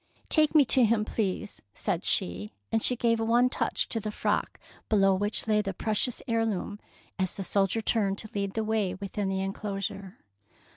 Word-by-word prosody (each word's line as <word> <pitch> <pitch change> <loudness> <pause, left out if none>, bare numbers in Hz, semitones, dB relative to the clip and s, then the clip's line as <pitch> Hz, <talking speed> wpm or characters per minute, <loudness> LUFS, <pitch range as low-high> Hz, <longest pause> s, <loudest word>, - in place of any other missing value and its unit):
" - - -34
Take 310 0 +3
me 295 -3 +7
to 255 +1 +4
him, 220 -1 +2
please," 210 -1 -3
said - - -2
she, 95 +4 -1 0.2
and 225 - +1
she 250 - +3
gave 230 -1 +1
one 235 +3 +3
touch - - -1
to 225 - -1
the 215 - -4
frock - - -1 0.3
below 195 -3 +4
which 205 +3 0
lay 210 -1 +3
the 195 -3 -4
precious 220 +4 0
heirloom 225 -3 -1 0.4
as 185 -1 0
the 195 - -3
soldier 200 +3 +1
turned 200 -3 +1
to 215 - -6
lead 200 -1 -3
the 220 - 0
way 215 -4 0
within 200 +1 -3
the 190 0 -1
enclosure. 195 0 -4
210 Hz, 185 wpm, -28 LUFS, 195-225 Hz, 0.4 s, me